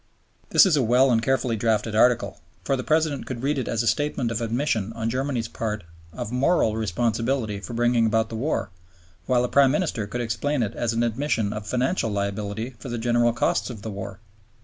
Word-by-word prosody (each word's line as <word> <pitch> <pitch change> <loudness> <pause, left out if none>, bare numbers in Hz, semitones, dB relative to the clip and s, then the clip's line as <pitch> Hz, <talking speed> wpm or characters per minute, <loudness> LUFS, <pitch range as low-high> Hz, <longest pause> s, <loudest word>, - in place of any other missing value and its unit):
This - - +7
is 180 -5 +3
a 145 - +2
well 125 +3 +4
and 115 -1 +3
carefully 125 -1 +1
drafted 110 0 0
Article; 110 -4 +2 0.2
for 135 - +1
the 130 - -3
President 155 -1 0
could 125 -1 -5
read 145 0 +1
it 125 - -3
as 115 0 -1
statement 125 -1 0
of 115 - -2
admission 115 -2 -1
on 115 0 -2
Germany's 130 -2 -1
part 105 -3 -4 0.3
of 105 - -6
moral 125 -3 +2
responsibility 115 +1 -1
for 105 - -8
bringing 120 -1 +3
about 110 +1 +1
the 115 - -6
war, 130 - -2 0.6
while 125 -1 +3
the - - +1
Prime 140 +1 +5
Minister 135 - -1
could 120 +4 -3
explain 120 +4 -1
it 105 - -3
as 120 - -1
an 115 +1 +1
admission 115 -3 0
of 105 0 -6
financial 125 - 0
liability 100 +3 -3
for 125 - -8
the 120 - -3
general 120 +1 +2
costs 115 - 0
of 110 -5 -8
the 110 - -4
war. 100 0 -7
115 Hz, 200 wpm, -24 LUFS, 110-130 Hz, 0.6 s, This